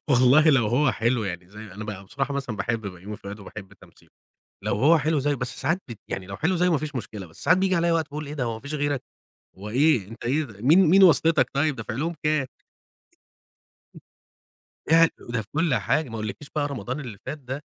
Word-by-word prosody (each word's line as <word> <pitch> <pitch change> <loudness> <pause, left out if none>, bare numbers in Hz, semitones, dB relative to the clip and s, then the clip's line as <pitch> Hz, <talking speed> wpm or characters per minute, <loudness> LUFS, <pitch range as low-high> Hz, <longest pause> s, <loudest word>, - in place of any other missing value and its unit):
والله 135 +4 +5
لو 130 -6 +3
هو 130 +6 +2
حلو 115 0 0
يعني 90 -1 -5
زي 105 - -14
أنا 105 +3 -7
بقى 100 -2 -7
بصراحة 140 +6 -3
مثلًا 130 -6 -3
باحب 115 +1 -1
بيومي 95 +3 -7
فؤاد، 100 +1 -9
وباحب 100 0 -10
تمثيله - - -20 0.5
لو - - 0
هو 155 +9 +5
حلو 155 +1 +1
زيّه 145 +1 +1
بس 125 -2 -4
ساعات 165 +7 0
بت 115 -4 -8
يعني 95 - -4
لو 95 0 -7
حلو 175 +4 0
زيّه 180 +1 +2
ما 155 - +3
فيش 150 -1 -5
مشكلة 105 -6 -6
بس 80 - -11
ساعات 180 - +5
بييجي 190 0 +2
عليّا 170 0 +2
وقت 165 -1 +2
باقول 150 +1 -5
إيه 145 - -6
ده 135 -4 -2
هو 115 -1 -2
ما 110 - -8
فيش 140 +2 -6
غيرك، 145 -2 -1 0.6
هو 100 +2 -7
إيه 130 -4 +3
أنت 115 +2 -10
إيه 145 +6 +1
مين 160 - +5
مين 195 +3 +7
واسطتك 165 -2 +5
طيب 145 +1 +1
دافع 115 -2 -5
لهم 165 +7 -2
كام؟ 150 -2 +1 2.5
يع 165 0 +7
وده 120 -1 -3
في 105 - -14
كل 160 -4 +2
حاجة 130 +7 0
ما 115 - -7
أقولكيش 110 +6 -6
بقى 145 -1 +1
رمضان 130 0 -4
اللي 120 -8 -7
فات 155 - -4
ده 135 +1 -6
135 Hz, 215 wpm, -25 LUFS, 110-155 Hz, 2.5 s, مين